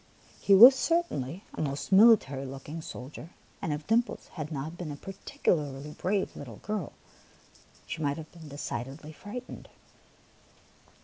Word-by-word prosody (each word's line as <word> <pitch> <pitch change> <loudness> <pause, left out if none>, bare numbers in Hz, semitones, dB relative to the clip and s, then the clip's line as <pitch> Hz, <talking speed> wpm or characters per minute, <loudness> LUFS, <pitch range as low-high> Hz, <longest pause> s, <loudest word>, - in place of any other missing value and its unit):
He 200 - +6
was 240 +7 +11
certainly 230 - -1
a - - -4
most 140 +2 -3
military 190 - +6
looking 135 +4 -7
soldier, 150 +2 -9 0.3
and 160 - -2
if 150 +1 -3
Dimples 235 +3 0
had 155 -2 -6
not 155 +3 -4
been 170 -3 -6
a - - -5
particularly 150 -5 -2
brave 190 +5 -1
little 120 -6 -8
girl, 210 -6 -4 0.9
she - - -5
might 145 -1 0
have 160 -1 -9
been 165 -3 -12
decidedly 140 +2 -6
frightened. 245 +10 -9
155 Hz, 135 wpm, -29 LUFS, 140-195 Hz, 0.9 s, was